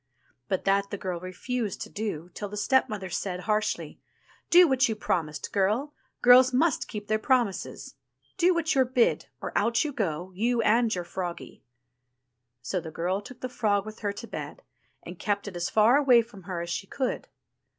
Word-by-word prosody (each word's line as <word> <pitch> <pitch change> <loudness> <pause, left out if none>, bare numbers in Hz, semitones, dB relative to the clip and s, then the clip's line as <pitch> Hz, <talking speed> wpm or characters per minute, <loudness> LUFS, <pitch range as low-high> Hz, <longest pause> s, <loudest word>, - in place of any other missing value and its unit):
'* 125 -1 -41
But 190 - -1
that 200 0 +2
the 205 - -4
girl 185 -2 -4
refused 205 +5 -4
to - - -5
do, 180 -6 -4
till 205 - -5
her 210 - -7
stepmother 210 -4 +1
said 180 0 -3
harshly: 215 +1 -1 0.5
Do 355 0 +8
what 260 -3 +3
you 220 - -1
promised, 160 -7 -2
girl; 215 +9 +1 0.3
girls 250 +1 +8
must 305 +6 +1
keep 210 -3 -6
their 215 +1 0
promises. 240 -5 -1 0.4
Do 360 0 +4
what 325 -1 +1
you*re 260 -3 +2
bid, 250 -3 +2
or - - -6
out 235 +4 +2
you 300 -2 -3
go, 180 -5 -2
you 235 +5 0
and 230 +2 +3
your 180 - -3
froggie." 175 -1 -6 1.0
So 185 - -1
the 160 - -7
girl 180 +5 -2
took 245 +4 -12
the 255 - -2
frog 210 -5 0
with 215 0 -9
her 205 -2 -1
to 205 +4 -8
bed, - - -7 0.4
and - - -9
kept 205 -2 -1
it 195 - -7
as 175 0 -2
far 220 +5 +5
away 255 -5 +5
from 205 -6 -15
her 175 -2 -2
as 170 - -5
she 195 - -3
could. 260 +3 -3
210 Hz, 190 wpm, -27 LUFS, 190-250 Hz, 1.0 s, Do